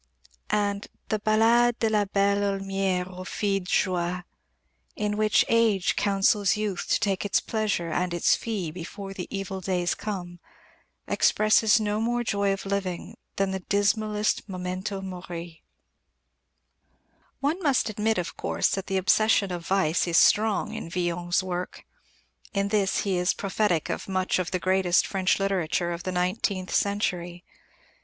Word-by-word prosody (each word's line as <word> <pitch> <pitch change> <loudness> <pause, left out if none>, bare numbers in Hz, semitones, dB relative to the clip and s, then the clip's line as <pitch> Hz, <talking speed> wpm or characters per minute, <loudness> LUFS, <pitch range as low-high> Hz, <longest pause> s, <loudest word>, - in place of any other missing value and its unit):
And 205 -1 -1 0.2
the 215 - 0
Ballade 230 +3 +3
de 225 - +1
la 210 -1 +2
Belle 200 0 +2
Heaulmière 195 -2 -1
aux - - -5
Filles 195 +1 -1
de 180 - -10
Joie, 180 -1 0 0.7
in 210 0 -1
which 215 0 +3
Age 225 -5 +2
counsels 200 0 +2
Youth 210 -4 -3
to - - +3
take 195 -3 0
its 205 -1 +2
pleasure 210 -7 -2
and 180 +2 -1
its 175 -1 +3
fee 200 -8 -3
before 195 +4 -7
the 180 -2 -6
evil 195 -1 -4
days 180 -1 0
come, 175 -4 -6 0.7
expresses 215 +1 +4
no 210 0 -1
more 240 +1 0
joy 200 -3 0
of 195 0 -3
living 195 -3 -3 0.2
than 195 -1 0
the 190 - -2
dismallest 210 +2 0
memento 185 +2 -4
mori. 175 -3 -7 1.8
One 305 +7 -1
must 280 -8 +2
admit, 215 0 0
of 175 -2 -3
course, - - 0
that 195 -1 -3
the 195 - 0
obsession 200 +1 +3
of 175 -1 -5
vice 185 -3 +2
is 170 -1 +2
strong 215 0 +3
in 225 -7 -6
Villon's 175 +1 -1
work. 180 -1 -5 0.7
In 200 0 0
this 200 -2 +1
he 195 -3 0
is 180 +2 +1
prophetic 195 -4 0
of - - -5
much 185 -1 0
of 180 -1 -2
the 185 - -1
greatest 185 -1 +2
French 190 -1 +1
literature 180 -3 0
of 170 0 -4
the 185 - -3
nineteenth 185 +1 -1
century. 180 -4 -1
195 Hz, 150 wpm, -26 LUFS, 180-210 Hz, 1.8 s, expresses